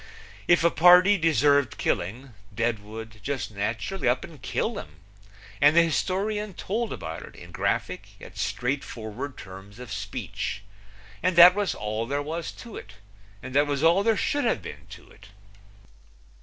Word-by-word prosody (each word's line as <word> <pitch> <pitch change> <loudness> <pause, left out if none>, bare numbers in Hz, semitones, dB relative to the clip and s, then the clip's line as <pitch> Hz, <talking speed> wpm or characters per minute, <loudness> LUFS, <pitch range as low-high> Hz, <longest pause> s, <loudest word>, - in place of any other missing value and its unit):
If 175 -1 +4
a 170 - +4
party 180 +4 +7
deserved 145 -4 +3
killing 120 +8 -2 0.2
Deadwood 110 0 -4
just 125 -1 -3
naturally 115 - -2
up 125 +1 0
and 150 -7 -12
killed 95 - -2
him, 75 - -11 0.7
and 145 +2 +6
the 170 - +7
historian 195 +5 -1
told 225 +3 -3
about 80 0 -6
it - - -12
in - - -12
graphic - - -2
yet - - -12
straightforward 125 -1 -4
terms 95 +2 -11
of 125 -3 -10
speech; 100 0 -5 0.6
and 185 +1 +1
that 175 +1 +10
was 205 0 -1
all 110 +2 -3
there 140 +2 -1
was 160 +2 -4
to 230 - -10
it, 105 - -11 0.5
and 130 0 -7
that 145 +2 +3
was 145 0 -1
all 170 +4 +5
there 220 0 +2
should 290 +6 0
have 225 - 0
been - - -9
to - - -12
it. 95 - -17
140 Hz, 155 wpm, -26 LUFS, 110-175 Hz, 0.7 s, that